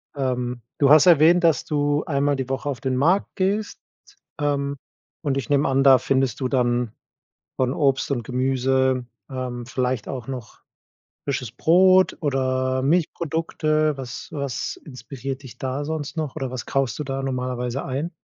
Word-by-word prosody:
Ähm, 125 -3 -2 0.2
du 140 - +4
hast 155 +4 +8
erwähnt, 170 +1 +6
dass 160 -6 +3
du 145 0 0
einmal 145 -1 +1
die 130 -1 -4
Woche 135 +2 -2
auf 125 -4 -4
den 130 -1 -1
Markt 170 +9 +2
gehst. 205 +2 -1 0.6
Ähm, 140 -1 -1 0.4
und 140 -4 -1
ich 135 - -4
nehme 145 0 +3
an, 135 0 +2
da 135 -1 +8
findest 130 -1 0
du 130 - 0
dann 120 -3 +1 0.7
von 130 -1 +1
Obst 135 -2 +1
und 120 -5 -1
Gemüse, 130 0 +1 0.2
ähm, 125 -2 -5
vielleicht 125 -1 -2
auch 125 -3 -6
noch 125 -4 -7 0.6
frisches 130 -5 -3
Brot 185 +5 +4
oder 130 -2 0
Milchprodukte. 155 -1 0
Was 130 -3 -7
was 140 -5 -3
inspiriert 135 -1 -7
dich 125 -2 -12
da 135 +2 -3
sonst 155 0 -4
noch? 155 -2 -3
Oder 135 -4 -3
was 130 -2 -6
kaufst 135 -5 -1
du 150 - -3
da 135 0 -3
normalerweise 125 -1 -3
ein? 140 +6 -3
135 Hz, 160 wpm, -23 LUFS, 130-145 Hz, 0.7 s, hast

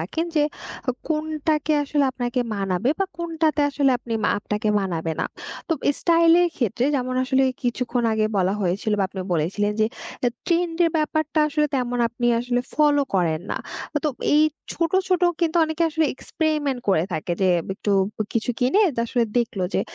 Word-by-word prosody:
রাখেন 320 - -2
যে 295 - +5 0.5
অ - - +5 0.2
কোনটাকে 310 0 0
আসলে 290 0 +1
আপনাকে 245 0 -2
মানাবে 195 +5 0
বা 390 - +2
কোনটাতে 325 -3 0
আসলে 275 -1 +2
আপনি 235 -1 -7
মা - - +3
আপনাকে 210 +1 -2
মানাবে 165 -4 -2
না। - - 0 0.4
তো - - +2 0.3
স্টাইল 335 -1 +4
এর 350 - +3
ক্ষেত্রে 240 0 0
যেমন 255 0 -2
আসলে 265 +1 +2 0.2
কিছুক্ষণ 245 0 -1
আগে 215 0 +1
বলা 190 +1 +2
হয়েছিল 200 +4 0
বা 195 - +2
আপনি 190 -1 -6
বলেছিলেন 190 +6 0
যে 215 - +4 0.4
এ - - +5 0.2
ট্রেন্ডের 340 -1 +2
ব্যাপারটা 310 0 0
আসলে 300 0 +1
তেমন 245 -1 -1
আপনি 240 +1 -2
আসলে 245 0 0
ফলো 290 -1 +4
করেন 165 -3 +1
না। - - -2 0.4
আ - - +5
তো 300 - +3 0.3
এই 305 - +6 0.3
ছোট, 335 0 -1 0.2
ছোট 365 -1 +2 0.2
কিন্তু 335 0 +1
অনেকে 315 +1 -2
আসলে 320 +1 +1
এক্সপেরিমেন্ট 300 -4 -1
করে 170 -4 +3
থাকে 160 +2 -2
যে 185 - +4 0.2
বে - - -1
একটু 205 - 0 0.4
কিছু 230 +1 0
কিনে 255 +10 +2
এটা 250 -7 -2
আসলে 240 0 +1
দেখলো 215 -6 -1
যে - - +3
255 Hz, 175 wpm, -23 LUFS, 210-310 Hz, 0.5 s, এই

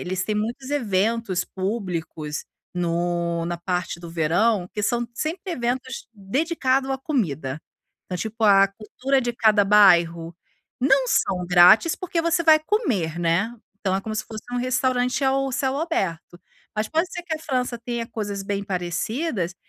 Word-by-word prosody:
eles 185 +1 -2
têm 215 +2 -2
muitos 235 +5 -3
eventos 220 -6 0
públicos 180 -7 -4 0.3
no 170 -1 -1
na 175 0 -2
parte 180 0 -3
do 170 -1 -9
verão, 175 +5 +1
que 210 - -3
são 240 +2 0
sempre 345 - -3
eventos 255 0 -3
dedicado 265 - 0
à 265 - -2
comida. 155 - -2 0.5
Então 180 - -4
tipo, 220 +3 -3
a 195 -1 +7
cultura 250 +7 -1
de 240 -1 -2
cada 215 -3 +4
bairro. 170 -5 +4 0.5
Não 270 0 +4
são 180 -6 +1
grátis, 180 - +6
porque 350 -2 -2
você 335 +1 +1
vai 315 -1 +7
comer, 245 - -1
né. 175 +8 +1 0.2
Então 190 -2 -1
é 190 - 0
como 215 +2 -5
se 215 0 -2
fosse 220 -1 -8
um 245 - -1
restaurante 255 +1 0
ao 270 0 +1
céu 265 +1 0
aberto. 185 - -3 0.3
Mas 215 0 -1
pode 330 +3 0
ser 350 - -5
que 335 -2 -3
a - - -5
França 255 -5 -2
tenha 235 -1 -4
coisas 205 -3 -4
bem 200 0 -2
parecidas 185 - -2
215 Hz, 160 wpm, -23 LUFS, 180-260 Hz, 0.5 s, a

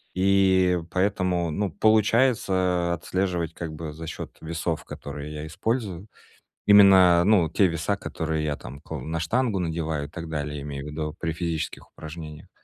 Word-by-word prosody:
И 95 -1 +4
поэтому, 90 -3 0
ну, 100 +4 -1
получается 100 -5 +2
отслеживать 85 -1 -2
как 80 -2 -6
бы 75 -1 -6
за 80 +1 -8
счет - - -7
весов, 80 0 -3
которые 75 +1 -7
я 75 +1 -6
использую. 100 +1 -3 0.6
Именно, 95 -4 +7
ну, 95 -6 +4
те 100 - +3
веса, 85 +4 -1
которые 80 -4 -3
я 75 -1 -1
там 70 +3 -10
кл 80 -2 -6
на 80 +4 -3
штангу 110 +4 0
надеваю 80 -3 -2
и - - -17
так 85 +1 -7
далее, 75 -2 -3
имею 70 -1 -6
в - - -6
виду 75 0 -4
при 80 - -2
физических 80 -1 -4
упражнениях. 75 -1 -9
85 Hz, 155 wpm, -25 LUFS, 80-95 Hz, 0.6 s, Именно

